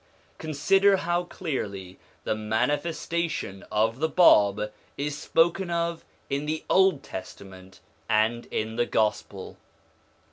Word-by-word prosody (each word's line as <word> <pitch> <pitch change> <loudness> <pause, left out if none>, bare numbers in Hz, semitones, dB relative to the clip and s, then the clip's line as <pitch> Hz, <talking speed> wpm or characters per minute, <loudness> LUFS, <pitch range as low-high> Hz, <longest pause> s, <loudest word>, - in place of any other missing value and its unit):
Consider 195 +6 +3
how 175 0 -1
clearly 100 - -5 0.2
the - - 0
manifestation 125 - -2
of 110 +3 +1
the 160 +1 +1
Bab 105 - +4 0.2
is 145 +1 -2
spoken 170 +5 +1
of 170 -1 -2 0.2
in 140 +1 -2
the 155 +1 -2
Old 190 -7 +4
Testament 95 0 -10 0.3
and 110 +2 +1
in 110 +1 -3
the 120 - +1
Gospel. 105 -3 -2
140 Hz, 110 wpm, -26 LUFS, 105-170 Hz, 0.3 s, Bab